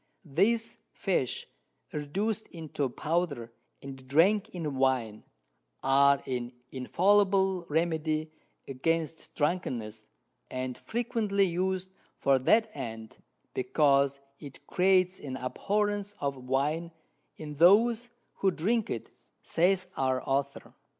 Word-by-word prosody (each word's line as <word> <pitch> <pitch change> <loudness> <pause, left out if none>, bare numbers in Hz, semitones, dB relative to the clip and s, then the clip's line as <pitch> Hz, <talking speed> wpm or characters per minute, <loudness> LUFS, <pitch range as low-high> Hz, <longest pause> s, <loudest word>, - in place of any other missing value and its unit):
These 215 +10 +1 0.2
Fish 175 - -1 0.5
reduc'd 195 +10 -2
into 155 -5 -3
Powder, 150 -5 -2 0.3
and 135 -1 -9
drank 185 +9 +3
in 160 -5 -4
Wine, 125 -5 +1 0.6
are 140 +1 +4
an 125 -1 -3 0.2
infallible 190 +5 +2
Remedy 155 -1 0 0.4
against 160 +4 -2
Drunkenness, 120 -10 -2 0.4
and 130 0 -4
frequently 220 - 0
us'd 185 +1 -1 0.3
for 135 -1 +3
that 220 - +3
end, 115 -5 -7 0.4
because 140 0 +2 0.2
it 140 -3 -11
creates 185 0 +3
an 130 -2 -6
Abhorrence 205 +9 -1
of 140 -1 -1
Wine 150 +6 0 0.5
in 150 -1 -7
those 225 +8 +5 0.3
who 195 - +3
drink 205 +6 0
it, 115 - -5 0.3
says 185 +2 +2
our 130 -1 0
Author. 140 +1 -2
155 Hz, 105 wpm, -29 LUFS, 135-190 Hz, 0.6 s, those